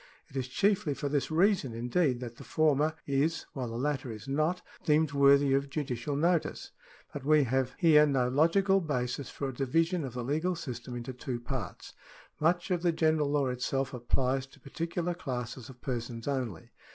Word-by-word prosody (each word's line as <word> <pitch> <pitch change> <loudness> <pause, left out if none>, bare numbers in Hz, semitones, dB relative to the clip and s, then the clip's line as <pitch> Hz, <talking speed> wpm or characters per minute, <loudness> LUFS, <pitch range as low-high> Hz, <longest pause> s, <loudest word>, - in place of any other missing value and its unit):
It - - -16
is 130 -2 -2
chiefly 195 +1 +1
for 145 - -3
this 140 -2 0
reason, 170 - +2
indeed, 125 +2 +1
that 120 -2 -7
the - - -10
former 155 0 +2
is, 145 +4 0
while 130 -3 -3
the 115 - -6
latter 135 -1 -1
is 110 +3 -9
not, 155 +6 0 0.2
deemed 155 -2 +3
worthy 140 0 +5
of 140 +1 +1
judicial_ 140 -1 -3
notice. 170 +1 0 0.4
But 140 - -6
we 150 +1 +5
have 130 0 0
liere 150 -2 +7
no 130 -3 +2
logical 190 +9 +3
basis 130 -4 -2
for 140 - -4
a - - -6
division 165 +7 +1
of 130 -4 -5
the 125 - -3
legal 160 +8 0
system 125 -6 -6
into 120 +2 -5
two 125 0 -4
parts. 120 - -6 0.5
Much 175 +4 +1
of 175 -2 +1
the 175 -1 +3
general 155 -2 +2
law 145 -1 +2
itself 130 +2 -2
applies 130 +2 0
to - - -19
particular 170 +4 -3
classes 125 -5 -5
of 125 -1 -13
persons 120 -2 -4
only. 125 - -3
140 Hz, 180 wpm, -30 LUFS, 125-160 Hz, 0.5 s, liere